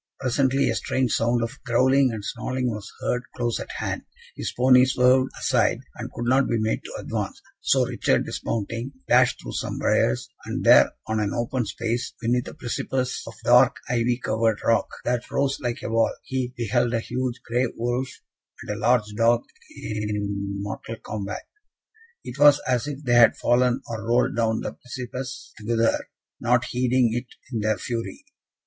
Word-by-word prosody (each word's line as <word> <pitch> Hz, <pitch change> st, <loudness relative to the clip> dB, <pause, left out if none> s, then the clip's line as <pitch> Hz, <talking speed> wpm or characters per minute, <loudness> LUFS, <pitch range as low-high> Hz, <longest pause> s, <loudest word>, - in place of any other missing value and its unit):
Presently, 135 Hz, +1 st, +2 dB
a -, -, +1 dB
strange 130 Hz, -3 st, 0 dB
sound 120 Hz, +1 st, +2 dB
of 115 Hz, -, -5 dB
growling 130 Hz, +2 st, +3 dB
and 105 Hz, -2 st, -6 dB
snarling 130 Hz, -1 st, -2 dB
was 105 Hz, -2 st, -7 dB
heard 125 Hz, -, 0 dB
close 120 Hz, -1 st, -1 dB
at -, -, -6 dB
hand: -, -, -3 dB, 0.3 s
his -, -, -3 dB
pony 125 Hz, 0 st, +6 dB
swerved 130 Hz, 0 st, +4 dB
aside, -, -, +2 dB
and -, -, -7 dB
could 120 Hz, -, -4 dB
not 130 Hz, +3 st, +3 dB
be 115 Hz, -, +1 dB
made 110 Hz, 0 st, -1 dB
to -, -, -8 dB
advance; -, -, -4 dB, 0.2 s
so -, -, +3 dB
Richard, -, -, +1 dB
dismounting, 115 Hz, +4 st, -3 dB
dashed 125 Hz, 0 st, +4 dB
through -, -, -7 dB
some -, -, -3 dB
briars, 60 Hz, -, +1 dB, 0.2 s
and -, -, -3 dB
there, -, -, +7 dB
on 110 Hz, 0 st, -1 dB
an 105 Hz, -1 st, -1 dB
open 120 Hz, 0 st, -1 dB
space, 115 Hz, +2 st, -3 dB
beneath 120 Hz, +2 st, 0 dB
a -, -, -8 dB
precipice 125 Hz, +1 st, -2 dB
of 115 Hz, -, -8 dB
dark 125 Hz, +1 st, +6 dB, 0.2 s
ivy 120 Hz, 0 st, +1 dB
covered 110 Hz, -3 st, 0 dB
rock, 115 Hz, -, +3 dB, 0.2 s
that 125 Hz, 0 st, -1 dB
rose 140 Hz, 0 st, 0 dB
like 120 Hz, -3 st, -3 dB
a -, -, -3 dB
wall, 115 Hz, 0 st, +3 dB
he 130 Hz, -1 st, -2 dB
beheld 120 Hz, +1 st, +1 dB
a -, -, +2 dB
huge 125 Hz, +1 st, -3 dB
grey 125 Hz, +2 st, +1 dB
wolf 120 Hz, +3 st, -1 dB, 0.5 s
and -, -, -4 dB
a -, -, -7 dB
large 120 Hz, -2 st, +3 dB
dog 115 Hz, +2 st, +3 dB, 0.4 s
in 105 Hz, -2 st, -3 dB
mortal 105 Hz, +3 st, -5 dB
combat. 105 Hz, -1 st, -5 dB, 0.8 s
It 125 Hz, +3 st, -8 dB
was 145 Hz, 0 st, +7 dB
as 125 Hz, +1 st, +1 dB
if 145 Hz, 0 st, -6 dB
they 125 Hz, -3 st, +1 dB
had 120 Hz, -1 st, +6 dB
fallen 125 Hz, +1 st, +2 dB
or 115 Hz, -3 st, -5 dB
rolled 120 Hz, +1 st, +2 dB
down 110 Hz, -1 st, +1 dB
the -, -, -4 dB
precipice 125 Hz, 0 st, -7 dB
together, 115 Hz, +1 st, 0 dB, 0.3 s
not 120 Hz, +1 st, +2 dB
heeding 125 Hz, -1 st, +2 dB
it 120 Hz, +1 st, -3 dB, 0.3 s
in 115 Hz, -, 0 dB
their 110 Hz, 0 st, +1 dB
fury. 120 Hz, -, -5 dB
120 Hz, 170 wpm, -24 LUFS, 115-125 Hz, 0.8 s, there